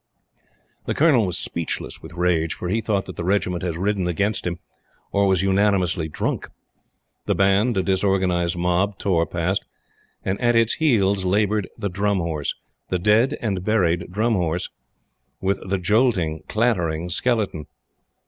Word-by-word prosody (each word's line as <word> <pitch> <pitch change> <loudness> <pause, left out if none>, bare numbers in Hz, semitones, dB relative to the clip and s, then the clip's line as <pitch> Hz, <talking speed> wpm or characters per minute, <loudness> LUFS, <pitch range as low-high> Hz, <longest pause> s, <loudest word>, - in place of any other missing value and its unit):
The - - -1
Colonel 140 - +4
was 90 -1 -1
speechless 85 -2 -4
with - - -11
rage, 85 -2 +1
for 90 - -5
he 110 +4 0
thought 100 -3 -1
that 95 - -9
the - - -3
Regiment 90 -1 0
had 85 -3 -3
risen 95 0 0
against 100 +3 -1
him 85 -1 -3 0.5
or 100 0 +2
was 95 -1 +2
unanimously 95 -4 +2
drunk. - - -3 0.8
The - - +2
Band, 100 +4 +3
a 95 - +2
disorganized 95 -3 +1
mob, 90 +3 +1
tore 85 -4 +1
past, 90 +3 -1 0.6
and 95 +1 -2
at 120 -1 +3
it's 115 0 +4
heels 100 - +2
labored 105 +2 +1
the 100 - -2
Drum 100 +1 0
Horse 80 -4 -2 0.3
the 90 - +1
dead 105 +7 +3
and 95 -5 -1
buried 90 -5 +1
Drum 110 +5 +1
Horse 90 -2 -1 0.7
with 95 +1 0
the 95 - +1
jolting, 90 -5 +1
clattering 90 -8 0
skeleton. 100 -6 -1
95 Hz, 150 wpm, -22 LUFS, 90-105 Hz, 0.8 s, Colonel